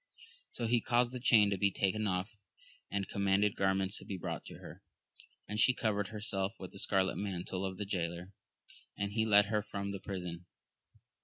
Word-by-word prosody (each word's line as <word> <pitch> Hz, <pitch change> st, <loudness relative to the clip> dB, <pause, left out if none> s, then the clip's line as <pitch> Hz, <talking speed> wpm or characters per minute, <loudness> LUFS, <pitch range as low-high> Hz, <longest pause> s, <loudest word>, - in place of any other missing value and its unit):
So 120 Hz, -, -3 dB
he 120 Hz, +1 st, +3 dB
caused 120 Hz, -1 st, +2 dB
the 130 Hz, -, -5 dB
chain 110 Hz, -5 st, +5 dB
to 100 Hz, -, 0 dB
be 100 Hz, -, +4 dB
taken 100 Hz, +3 st, 0 dB
off, 95 Hz, +2 st, -1 dB, 0.6 s
and 100 Hz, -1 st, -2 dB
commanded 100 Hz, +1 st, +2 dB
garments 95 Hz, 0 st, +1 dB
to -, -, -12 dB
be 95 Hz, -, -4 dB
brought -, -, -5 dB
her, -, -, -11 dB, 0.7 s
and 105 Hz, +1 st, -3 dB
she 125 Hz, +3 st, +5 dB
covered 105 Hz, -3 st, 0 dB
herself 105 Hz, -2 st, -2 dB
with 95 Hz, -, -8 dB
the 100 Hz, -, -9 dB
scarlet 95 Hz, -1 st, +1 dB
mantle 95 Hz, -1 st, -3 dB
of 95 Hz, -1 st, -3 dB
the 105 Hz, -, -3 dB
jaylor, 90 Hz, -1 st, -3 dB, 0.7 s
and 100 Hz, 0 st, -2 dB
he 110 Hz, +1 st, +1 dB
led 105 Hz, -1 st, +7 dB
her 105 Hz, 0 st, 0 dB
from 100 Hz, 0 st, -4 dB
the 100 Hz, -, -5 dB
prison. 90 Hz, -3 st, -6 dB
100 Hz, 180 wpm, -33 LUFS, 95-105 Hz, 0.7 s, led